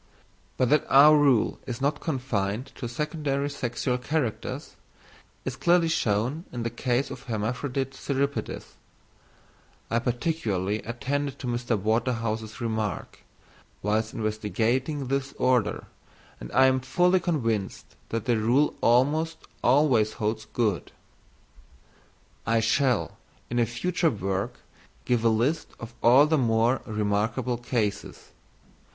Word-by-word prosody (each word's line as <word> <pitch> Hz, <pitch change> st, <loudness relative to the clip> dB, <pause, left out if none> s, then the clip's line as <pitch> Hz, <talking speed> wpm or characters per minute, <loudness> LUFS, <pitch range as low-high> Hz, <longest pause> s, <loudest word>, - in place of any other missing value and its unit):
But 130 Hz, 0 st, +2 dB
that 150 Hz, -1 st, +4 dB
our 145 Hz, +3 st, +8 dB
rule 140 Hz, -6 st, +3 dB
is 120 Hz, -2 st, -4 dB
not 145 Hz, +1 st, 0 dB
confined 125 Hz, -, -2 dB
to 120 Hz, -, -6 dB
secondary 145 Hz, +1 st, -2 dB
sexual 125 Hz, -1 st, -2 dB
characters 130 Hz, -3 st, -3 dB, 0.7 s
is 130 Hz, -, -3 dB
clearly 170 Hz, +2 st, +3 dB
shown 120 Hz, +4 st, 0 dB
in 120 Hz, -2 st, -4 dB
the 115 Hz, -, -2 dB
case 125 Hz, +2 st, -1 dB
of 125 Hz, -, -7 dB
hermaphrodite 125 Hz, +4 st, -2 dB
cirripedes; 140 Hz, +1 st, -2 dB, 1.3 s
I 115 Hz, -, +3 dB
particularly 115 Hz, -, -1 dB
attended 140 Hz, +4 st, -3 dB
to -, -, -8 dB
Mr. 120 Hz, -1 st, -1 dB
Waterhouse's 110 Hz, 0 st, -1 dB
remark, 110 Hz, -4 st, -3 dB, 0.6 s
whilst 110 Hz, +2 st, 0 dB
investigating 115 Hz, +6 st, -1 dB
this 135 Hz, +1 st, -2 dB
Order, 120 Hz, -5 st, +1 dB, 0.5 s
and -, -, -8 dB
I 130 Hz, +1 st, +5 dB
am 130 Hz, 0 st, +3 dB
fully 180 Hz, +8 st, +2 dB
convinced 115 Hz, -, -2 dB
that 115 Hz, -1 st, -3 dB
the 120 Hz, -2 st, +2 dB
rule 125 Hz, +7 st, +3 dB
almost 150 Hz, +7 st, +2 dB, 0.3 s
always 125 Hz, -5 st, +4 dB
holds 110 Hz, +1 st, -2 dB
good. 105 Hz, -7 st, -1 dB, 1.6 s
I 115 Hz, +1 st, +3 dB
shall, 125 Hz, +1 st, +1 dB, 0.3 s
in 120 Hz, -, +1 dB
a 115 Hz, -, +3 dB
future 175 Hz, -, 0 dB
work, 100 Hz, -5 st, -3 dB, 0.4 s
give 120 Hz, -2 st, +1 dB
a 115 Hz, -, +5 dB
list 120 Hz, +9 st, +1 dB
of 115 Hz, 0 st, -8 dB
all 130 Hz, +5 st, +7 dB
the 155 Hz, 0 st, +2 dB
more 115 Hz, +1 st, +2 dB
remarkable 110 Hz, +4 st, -1 dB
cases. 115 Hz, -4 st, -3 dB
120 Hz, 120 wpm, -26 LUFS, 110-140 Hz, 1.6 s, our